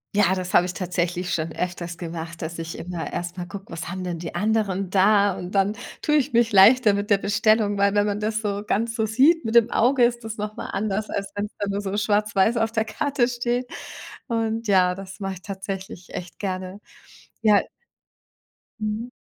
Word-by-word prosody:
Ja, 190 -2 +4
das 180 -1 -4
habe 175 - +5
ich 180 - -4
tatsächlich 180 -1 -2
schon 160 0 -2
öfters 175 -1 -4
gemacht, 165 -1 -6
dass 165 +1 -5
ich 165 0 -5
immer 175 -1 -5
erst 175 +1 -4
mal 180 - -4
gucke, 200 +1 -9
was 165 0 -5
haben 185 +1 -5
denn 175 -2 -4
die 165 0 -6
anderen 195 -1 0
da. 200 +1 +4
Und 180 +3 -7
dann 195 +1 +3 0.3
tue 300 - +2
ich 285 -1 0
mich 235 -1 +3
leichter 210 +3 +7
mit 205 +1 -2
der 205 - +5
Bestellung, 205 +1 +2
weil 200 0 +3
wenn 205 0 +3
man 205 0 -1
das 215 +1 -1
so 205 -2 -2
ganz 225 +3 0
so 225 -1 0
sieht 270 +8 +4
mit 225 +1 -2
dem 235 0 +6
Auge, 250 +2 +3
ist 235 -1 +1
das 220 0 -5
noch 210 +1 -5
mal - - -5
anders, 210 +1 -2
als 200 0 -3
wenn's 205 +1 -3
dann 205 -1 -1
nur 200 - -1
so 200 -1 -3
schwarz-weiß 210 +1 +2
auf 225 0 0
der 220 - +2
Karte 255 +4 0
steht. 245 0 -1 0.6
Und 225 -1 -1
ja, 185 -2 +4
das 195 +1 -10
mache 195 -1 -3
ich 185 - -12
tatsächlich 195 -2 -7
echt 175 -1 -7
gerne. 185 0 -4 0.6
Ja. 210 -2 +5 1.2
Mhm. 215 +3 -3
205 Hz, 205 wpm, -24 LUFS, 185-220 Hz, 1.2 s, leichter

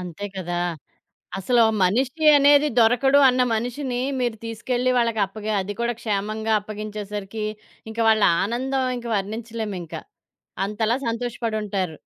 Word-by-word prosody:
అంతే 180 +2 -6
కదా! 175 -1 -3 0.8
అసలు 235 +5 +3 0.2
మనిషి 255 - +1
అనేది 285 +1 +5
దొరకడు 245 +5 +4
అన్న 255 0 +3
మనిషిని 245 +2 -2 0.2
మీరు 240 -2 -1
తీసుకెళ్ళి 245 +3 -1
వాళ్ళకప్పగ 215 -3 -1
అది 205 +2 -5
కూడా 235 0 0
క్షేమంగా 215 0 -2
అప్పగించేసరికి 210 0 -6 0.5
ఇంక 220 - -10
వాళ్ళ 220 -1 +4 0.2
ఆనందం 260 +5 -1
ఇంక 240 0 -7
వర్ణించలేమింకా. 215 -3 -5 0.7
అంతలా 220 +3 0
సంతోషపడుంటారు. 215 -7 -2
220 Hz, 110 wpm, -23 LUFS, 205-245 Hz, 0.8 s, అనేది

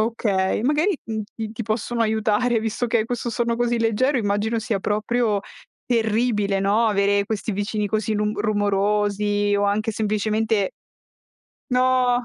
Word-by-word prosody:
Okay, 210 -3 0
magari, 305 +7 +2
mhmm, 220 -1 -3
ti 220 -1 -5
ti 230 - -5
possono 225 +2 -2
aiutare 220 +2 +1
visto 225 +2 -2
che 230 0 +1
hai 215 - +1
questo 240 0 -3
sonno 235 0 0
così 240 -1 +1
leggero 230 +5 +1
immagino 215 +1 0
sia 220 -2 -1
proprio 215 +1 0 0.4
terribile, 220 -3 +1
no, 210 +4 +2
avere 200 -1 +2
questi 220 0 -3
vicini 205 +1 -2
così 215 +1 -1
lung 210 0 -1
rumorosi 205 0 +1
o 205 - +1
anche 215 +2 0
semplicemente 215 -1 0 1.0
No. 250 -1 +2
215 Hz, 140 wpm, -22 LUFS, 205-235 Hz, 1.0 s, magari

